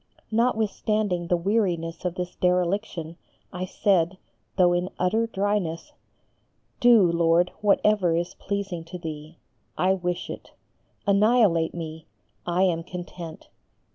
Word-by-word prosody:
Notwithstanding 215 -5 0
the 175 - +2
weariness 175 -4 -1
of 180 -1 -1
this 180 -1 -4
dereliction, 180 -2 -1 0.4
I 180 +1 -3
said, 185 -1 +1 0.4
though 180 -2 +5
in 175 +1 0
utter 220 +6 +1
dryness, 205 - -2 0.9
"Do, 240 -4 +6
Lord, 170 +1 +3
whatever 205 -4 +3
is 175 +2 -2
pleasing 195 -4 -4
to 180 +2 -7
Thee, 155 -1 -8 0.4
I 185 +1 +3
wish 180 -2 -3
it. - - -9 0.5
Annihilate 200 -5 +3
me, 160 -1 -7 0.4
I 175 +2 +2
am 170 -3 +2
content. 175 -2 -8
180 Hz, 115 wpm, -25 LUFS, 170-200 Hz, 0.9 s, Do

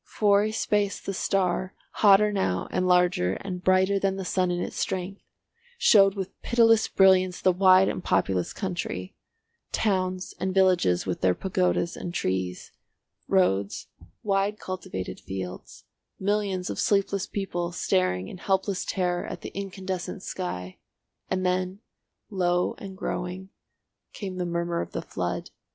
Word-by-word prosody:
For 205 -1 +3
a 215 - -1
space 210 -2 0
the 195 - -5
star, 185 -1 0 0.2
hotter 210 0 +5
now 95 - 0
and 185 - 0
larger 180 - +3
and 180 - -6
brighter 190 +2 +3
than 195 0 0
the 190 -1 -5
sun 185 0 +1
in 175 0 -1
its - - -4
strength, 190 +2 -3 0.6
showed 195 - +5
with 190 -2 -6
pitiless 225 -2 +4
brilliance 185 -1 +4
the 185 - +4
wide 185 +1 +5
and - - -3
populous 90 -2 +1
country; 175 - -4 0.6
towns 185 -3 -1
and 190 0 -2
villages 180 - +3
with 90 -2 -3
their 90 -1 +3
pagodas 180 -3 0
and 175 0 -6
trees, 95 - -2 0.6
roads, 100 - +1 0.3
wide 200 +1 +1
cultivated 185 - -6
fields, 95 -1 -7 0.4
millions 195 -2 -1
of - - -5
sleepless 200 -1 +1
people 175 -4 -3
staring 90 - 0
in 185 - -9
helpless 190 0 0
terror 180 -2 -1
at - - -7
the - - -8
incandescent 190 0 -5
sky; 90 - -5 0.5
and 185 0 -1
then, 185 +1 0 0.5
low 180 -2 +1
and 190 -2 -8
growing, 185 +1 -4 0.6
came 190 -3 -6
the 180 -1 -2
murmur 170 0 -1
of - - -7
the - - -2
flood. - - -4
185 Hz, 140 wpm, -26 LUFS, 175-195 Hz, 0.6 s, hotter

